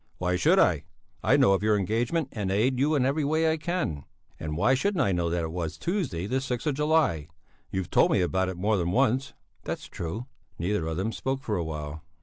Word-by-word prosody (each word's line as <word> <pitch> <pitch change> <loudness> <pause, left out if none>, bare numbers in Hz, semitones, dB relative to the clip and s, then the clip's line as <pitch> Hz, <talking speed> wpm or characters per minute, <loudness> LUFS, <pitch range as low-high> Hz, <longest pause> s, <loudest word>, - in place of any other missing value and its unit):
"Why 90 0 0
should 165 - +4
I? 80 - +3 0.4
I - - +4
know 100 - +5
of 95 - +1
your 105 0 +3
engagement 120 - 0
and 100 -3 -3
aid 125 +6 +2
you 150 +3 +3
in 130 -3 +2
every 145 +3 +1
way 160 +2 +2
I 160 - 0
can. 150 - -2 0.4
And 75 -1 -4
why 110 +9 +4
shouldn't 180 +4 +1
I 100 - +1
know 85 -2 0
that 85 0 -1
it 80 - -3
was 85 -2 -4
Tuesday 165 - -2
the 130 +6 -1
sixth 125 -1 -3
of 150 - +1
July? 150 - +1 0.4
You've 95 -3 -3
told - - +5
me - - +3
about 95 +1 +1
it 95 - -5
more 105 +3 +1
than 85 -2 0
once." 130 +5 +1 0.3
"That's - - -4
true!" 100 +9 -5 0.3
Neither 85 -1 -1
of 80 0 -3
them 100 +5 -1
spoke 135 +3 -3
for 105 - -1
a 85 - -1
while. 75 -1 -6
105 Hz, 225 wpm, -27 LUFS, 85-135 Hz, 0.4 s, know